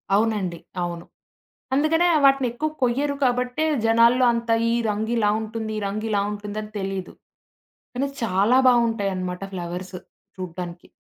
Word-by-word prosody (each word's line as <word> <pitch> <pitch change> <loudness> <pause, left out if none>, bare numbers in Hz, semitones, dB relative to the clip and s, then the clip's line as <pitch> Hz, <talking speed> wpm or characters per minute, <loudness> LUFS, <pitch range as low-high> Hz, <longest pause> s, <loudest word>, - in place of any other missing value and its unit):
అవునండి. 205 -6 0 0.2
అవును. 170 -1 -5 0.7
అందుకనే 320 +5 +3 0.2
వాటినెక్కువ 270 +1 +2
కొయ్యరు 280 +4 +1
కాబట్టే, 250 +4 +1 0.2
జనాల్లో 230 +3 +5
అంత 235 0 -3 0.2
ఈ - - +2 0.2
రంగు 215 +2 -2
ఇలా 210 -2 +3
ఉంటుంది, 220 0 -5
ఈ - - -7
రంగు 215 +3 -3
ఇలా 200 -1 +2
ఉంటుందని 210 +1 -6
తెలీదు. 195 -1 -4 0.8
కానీ, 275 +2 -1
చాలా 210 +5 +3
బావుంటాయన్నమాట 200 -7 0
ఫ్లవర్స్ 180 +1 -5 0.4
చూడ్డానికి. 175 -1 -7
220 Hz, 120 wpm, -23 LUFS, 190-245 Hz, 0.8 s, జనాల్లో